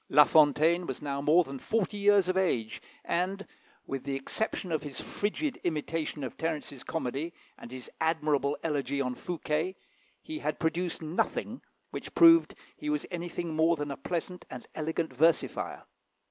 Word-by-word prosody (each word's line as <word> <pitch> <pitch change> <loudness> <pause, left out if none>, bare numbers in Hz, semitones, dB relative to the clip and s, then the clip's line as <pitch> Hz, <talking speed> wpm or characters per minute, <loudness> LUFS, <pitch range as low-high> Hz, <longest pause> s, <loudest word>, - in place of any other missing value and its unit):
La 150 +2 +8
Fontaine 160 +4 +4
was 130 - -4
now 140 -1 -3
more 155 +5 +5
than 135 -3 -7
forty 220 - 0
years 205 -2 +4
of 185 - +1
age, 125 -13 0 0.2
and, 190 +3 -1 0.4
with 135 -1 -4
the 140 -1 -2
exception 180 +6 -2
of 155 - +1
his 145 -3 -6
frigid 240 +8 -2
imitation 155 -2 -2
of 130 - -5
Terence's 150 -5 -3
comedy, 160 +2 -3 0.2
and 120 - -11
his 130 -1 -8
admirable 150 -3 +1
elegy 140 -3 -1
on 125 -2 0
Fouquet, 165 +4 -2 0.4
he 315 0 -6
had - - -2
produced 170 +1 -1
nothing 155 +3 -1 0.3
which - - -7
proved 335 -1 +7
that - - -25 0.2
he 300 - -4
was 300 0 0
anything 175 -1 -3
more 160 +2 +4
than 145 -2 -4
a - - -3
pleasant 180 +5 -4
and 125 - -8
elegant 160 -1 -2
versifier. 160 +5 +1
160 Hz, 160 wpm, -30 LUFS, 140-180 Hz, 0.4 s, La